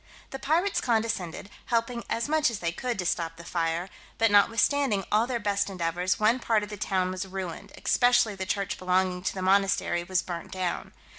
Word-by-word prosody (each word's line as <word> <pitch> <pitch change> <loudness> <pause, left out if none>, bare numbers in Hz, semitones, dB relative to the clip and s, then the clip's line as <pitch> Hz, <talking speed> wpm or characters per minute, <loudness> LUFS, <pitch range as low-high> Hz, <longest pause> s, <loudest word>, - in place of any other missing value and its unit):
The 270 - -5
pirates 340 +9 +1
condescended, 220 -6 -1 0.2
helping 235 0 0
as 230 - -1
much 305 -1 +3
as 230 - -4
they 170 -4 -2
could 245 +5 -3
to 180 - -2
stop 165 -1 -1
the 170 - -10
fire; 170 +1 -1 0.3
but, 225 -1 +3
notwithstanding 225 +1 +3
all 220 +3 +3
their 250 -2 -1
best 205 -1 0
endeavours, 180 0 -1
one 220 +4 +3
part 225 -3 +1
of 210 - -6
the 210 - -5
town 185 -2 0
was 185 +1 -4
ruined, 185 -3 -6
especially 245 -3 +3
the 190 -1 -5
church 200 -2 -2
belonging 185 0 +1
to 190 - -2
the 185 - -3
monastery 190 -2 +2
was 175 0 0
burnt 175 -3 -6
down. 185 -2 -3
195 Hz, 195 wpm, -27 LUFS, 180-230 Hz, 0.3 s, much